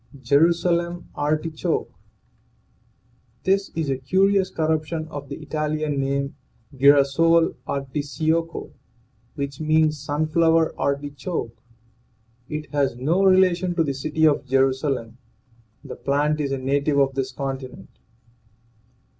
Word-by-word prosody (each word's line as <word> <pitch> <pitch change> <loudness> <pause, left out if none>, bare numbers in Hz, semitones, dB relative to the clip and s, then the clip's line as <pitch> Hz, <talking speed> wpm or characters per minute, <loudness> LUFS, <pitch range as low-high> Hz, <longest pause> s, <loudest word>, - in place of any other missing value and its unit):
JERUSALEM 170 +5 +2
ARTICHOKE. 155 +2 -2 1.5
This 195 +1 +1
is 160 -2 -1
a 130 - -2
curious 190 +7 +2
corruption 160 -1 -1
of 145 -2 -8
the 140 - -5
Italian 155 -1 -2
name, 140 +1 -1 0.4
girasole 145 +5 +4
articiocco, 150 +4 -2 0.6
which 140 -1 -4
means 155 -1 +2
sunflower 160 +2 +2
artichoke. 140 -2 -3 0.9
It 150 -1 -5
has 140 -4 0
no 160 +10 +1
relation 185 -2 +3
to 165 - +2
the 140 -3 -2
city 155 +3 0
of 145 -3 +2
Jerusalem. 130 -2 0 0.6
The - - -8
plant 150 +2 0
is 140 -2 -2
a 135 - -1
native 140 +2 0
of 135 -1 +3
this 135 -1 -2
continent. 135 -1 -7
150 Hz, 105 wpm, -23 LUFS, 140-165 Hz, 1.5 s, girasole